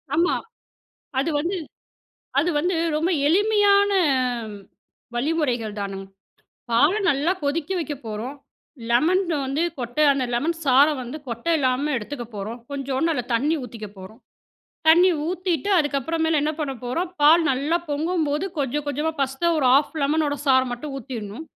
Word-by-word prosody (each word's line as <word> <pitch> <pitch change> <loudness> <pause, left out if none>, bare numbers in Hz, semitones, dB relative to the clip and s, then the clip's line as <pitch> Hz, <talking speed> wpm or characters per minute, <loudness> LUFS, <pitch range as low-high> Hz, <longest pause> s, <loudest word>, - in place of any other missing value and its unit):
ஆமா, 345 +3 +2 0.8
அது 285 - 0
வந்து 345 +6 -1 0.8
அது 330 +5 +1
வந்து 355 +3 0 0.2
ரொம்ப 325 +4 +1 0.2
எளிமையான 405 +2 +4 1.2
வழிமுறைகள் 245 -6 -1
தானங்க. 195 -1 -5 0.7
பால 265 +8 +5 0.2
நல்லா 285 +5 +1
கொதிக்க 295 +4 -1
வைக்க 310 -3 -3
போறோம் 225 +6 -5 0.5
லெமன் 330 +11 +3 0.2
வந்து 275 +5 -1 0.2
கொட்டை 245 +5 0
ஆன 280 - +6
அந்த 265 -2 0
லெமன் 310 +8 0
சாரை 280 +2 +5
வந்து 250 +4 -6
கொட்ட 235 +2 -6
இல்லாம 270 +2 0
எடுத்துக்க 240 +3 -6
போறோம். 215 +4 -5
கொஞ்சோண்டு 275 +3 -1
அதில 250 -5 -2
தண்ணி 295 +7 +1
ஊத்திக்க 225 -3 -8
போறோம், 195 +6 -11 0.7
தண்ணி 350 +3 +7 0.2
ஊத்திட்டு 360 -1 -1
அதுக்கப்புற 290 +1 -1
மேல 320 -1 +2
என்ன 300 +1 0
பண்ண 280 -3 -2
போறோம். 335 +9 -2
பால் 320 +3 +6
நல்லா 285 +6 0
பொங்கும்போது 310 +1 0
கொஞ்சம் 285 +2 -1
கொஞ்சமா 300 +3 -1
ஃபர்ஸ்ட்டு 275 +6 +1
1 270 - +2
ஹாஃப் 290 +3 +2
லெமனோட 290 0 +1
சாரை 260 -1 +5
மட்டும் 275 +3 -5
ஊத்திர்ணும். 235 +2 -7
290 Hz, 140 wpm, -23 LUFS, 255-325 Hz, 1.2 s, தண்ணி